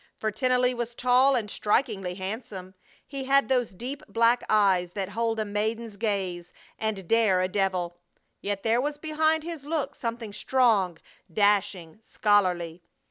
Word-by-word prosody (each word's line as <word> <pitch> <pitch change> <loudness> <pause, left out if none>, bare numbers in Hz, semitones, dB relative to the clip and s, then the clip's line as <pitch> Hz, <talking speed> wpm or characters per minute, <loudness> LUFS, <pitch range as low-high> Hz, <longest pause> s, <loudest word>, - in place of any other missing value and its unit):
For 215 - -2
Tennelly 250 +3 +2
was 240 -1 -4
tall 255 +3 +4
and 225 -4 -1
strikingly 205 -4 0
handsome. 190 -1 -6 0.3
He 275 -2 -6
had 275 +1 +3
those 245 -6 +1
deep 260 +8 -6
black 230 +1 +2
eyes 190 -4 +3
that 195 -2 -3
hold 225 +2 -1
a 215 - 0
maiden's 215 +2 -2
gaze 190 -5 -2 0.3
and 210 -5 -3
dare 220 -4 +3
a 185 - +1
devil; 185 -3 -1 0.4
yet 200 -1 -3
there 230 +2 +2
was 290 +2 -2
behind 315 +1 +1
his 330 -3 -6
look 300 -1 -2
something 230 -3 -5
strong, 210 -7 +2 0.3
dashing, 200 -2 +1
scholarly. 180 -6 +1
215 Hz, 145 wpm, -27 LUFS, 195-250 Hz, 0.4 s, tall